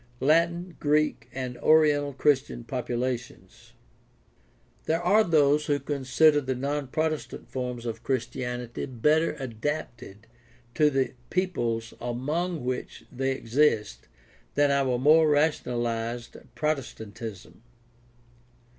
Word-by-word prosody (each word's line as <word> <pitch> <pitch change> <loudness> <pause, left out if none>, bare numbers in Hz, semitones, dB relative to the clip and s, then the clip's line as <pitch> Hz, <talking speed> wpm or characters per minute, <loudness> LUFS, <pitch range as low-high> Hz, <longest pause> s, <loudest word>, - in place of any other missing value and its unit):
Latin, 170 +4 +2
Greek, 150 +1 +1
and 130 -2 -5
oriental 150 -2 +4
Christian 135 -3 +1
populations. 120 0 -4 0.6
— - - -36
There 165 +1 +2
are 195 +5 +4
those 150 -4 +3
who 145 -1 +1
consider 145 +2 +3
the 130 -1 -2
non 140 +2 -2
Protestant 155 +3 -3
forms 125 -2 -4
of 115 -1 -4
Chris 130 -2 0
tianity 125 -1 -5
better 155 +5 +3
adapted 120 -4 -5 0.5
to 150 +2 +4
the 135 -2 0 0.2
peoples 120 -12 -1
among 145 +6 -2
which 125 0 -4
they 135 +1 -1
exist 115 - 0 0.5
than 145 0 +4
our 135 -3 +2
more 155 +4 +5
rationalized 120 -6 0 0.2
Protestantism. 115 - -4
135 Hz, 105 wpm, -27 LUFS, 120-150 Hz, 0.6 s, more